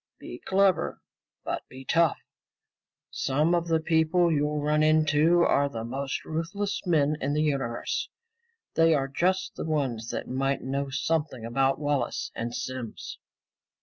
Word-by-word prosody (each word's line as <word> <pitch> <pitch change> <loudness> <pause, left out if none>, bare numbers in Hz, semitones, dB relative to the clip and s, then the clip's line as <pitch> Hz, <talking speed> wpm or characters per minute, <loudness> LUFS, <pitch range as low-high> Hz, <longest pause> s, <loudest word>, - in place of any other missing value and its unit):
"Be - - -9
clever, 190 - +2 0.4
but - - -3
be 130 +1 -11
tough. 165 +3 +3 0.9
Some 150 +5 +1
of 170 -1 +1
the 165 -1 +2
people 165 +2 +2
you'll 150 0 0
run 150 +1 +1
into 155 +2 +4
are 140 -3 +3
the 115 -4 -5
most 135 +3 -4
ruthless 190 +6 -3
men 150 -3 +2
in 140 +2 0
the 150 - +2
universe. 135 -6 -1 0.6
They 165 -1 +4
are 135 -2 0
just 185 +7 0
the - - -5
ones 130 -8 -1
that - - -4
might 135 +2 -1
know 140 +1 -2
something 145 -3 -1
about 135 +3 +1
Wallace 145 -2 -1
and 120 +1 -4
Simms." 130 -4 -6
150 Hz, 145 wpm, -27 LUFS, 135-165 Hz, 0.9 s, into